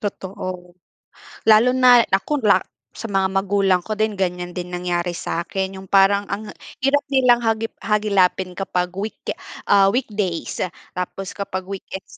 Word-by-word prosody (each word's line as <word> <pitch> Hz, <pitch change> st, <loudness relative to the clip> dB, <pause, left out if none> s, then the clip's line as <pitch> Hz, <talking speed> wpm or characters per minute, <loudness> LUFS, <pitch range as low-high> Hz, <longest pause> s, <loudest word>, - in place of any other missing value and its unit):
Totoo. 185 Hz, -3 st, -6 dB, 0.7 s
Lalo 220 Hz, +3 st, +6 dB
na 245 Hz, -2 st, +7 dB
nako 265 Hz, +9 st, +1 dB
la 200 Hz, -3 st, +6 dB, 0.4 s
sa 230 Hz, -, -7 dB
mga 195 Hz, -1 st, +1 dB
magulang 195 Hz, -1 st, +2 dB
ko 215 Hz, +3 st, -5 dB
din 215 Hz, 0 st, +1 dB
ganyan 180 Hz, -2 st, -3 dB
din 180 Hz, -1 st, -5 dB
nangyari 175 Hz, -1 st, -2 dB
sakin 190 Hz, +2 st, -3 dB
yung 190 Hz, -, -14 dB
parang 200 Hz, +1 st, +4 dB
ang 210 Hz, +2 st, -4 dB, 0.3 s
hirap 275 Hz, +2 st, +2 dB
nilang 250 Hz, -3 st, +4 dB
hagip 225 Hz, -1 st, -1 dB
hagilapin 195 Hz, -4 st, +1 dB
kapag 180 Hz, -1 st, -2 dB
week 205 Hz, +3 st, -5 dB, 0.5 s
ah, 195 Hz, -1 st, +6 dB
weekdays. 205 Hz, -9 st, -2 dB, 0.4 s
Tapos 185 Hz, +1 st, -4 dB
kapag 190 Hz, -2 st, -4 dB
weekends 195 Hz, 0 st, -8 dB
195 Hz, 140 wpm, -21 LUFS, 185-215 Hz, 0.7 s, na